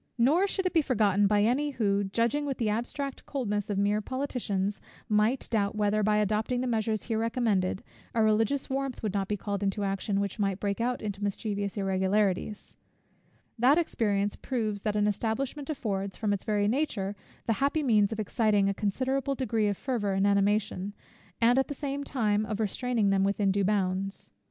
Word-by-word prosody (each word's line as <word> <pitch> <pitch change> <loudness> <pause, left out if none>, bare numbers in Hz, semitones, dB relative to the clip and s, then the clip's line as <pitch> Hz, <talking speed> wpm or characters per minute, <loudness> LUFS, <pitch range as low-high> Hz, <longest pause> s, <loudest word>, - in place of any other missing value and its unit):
Nor 305 +11 +4
should 380 -1 -2
it 365 - 0
be 330 - +5
forgotten 205 -7 +2
by 205 0 +3
any 265 +7 +2
who, 205 -7 +1
judging 235 +9 0
with 275 - -2
the 225 -3 0
abstract 250 +5 -3
coldness 210 -7 -2
of 205 - -1
mere 205 +1 +2
politicians, 215 -6 -2 0.3
might 215 +4 +2
doubt 205 -2 +1
whether, 210 0 +1
by 210 0 +3
adopting 215 +4 0
the 255 - -1
measures 220 -3 0
here 225 -2 -1
recommended, 225 -5 0 0.3
a 225 - +3
religious 220 +6 +2
warmth 270 -2 -3
would 210 -3 -1
not 195 -2 -1
be 210 - -1
called 200 0 -3
into 200 +1 -1
action, 195 +1 -1
which 200 +2 -3
might 195 -2 0
break 200 +2 -2
out 245 0 -1
into 205 -1 -4
mischievous 200 0 -2
irregularities; 195 +1 0 0.8
that 260 +6 +5
experience 205 -11 0
proves 215 -6 -2
that 210 0 -1
an 210 0 +2
establishment 250 +7 -2
affords, 200 -9 -3
from 210 -2 0
its 200 - -3
very 205 -1 +1
nature, 210 -6 -1 0.3
the 225 - +2
happy 295 +3 +2
means 215 -6 +3
of 220 - -4
exciting 210 -1 +2
a 200 - +1
considerable 265 +7 -1
degree 230 -5 0
of 200 -2 -1
fervour 225 -7 -1
and 195 +1 +2
animation, 200 0 +1 0.4
and 240 +3 +5
at 270 - +1
the 285 - -5
same 280 0 -3
time 215 -7 0
of 210 +1 -3
restraining 220 0 0
them 195 0 +3
within 200 0 +2
due 200 +1 +1
bounds. 195 -1 0
210 Hz, 185 wpm, -29 LUFS, 200-245 Hz, 0.8 s, be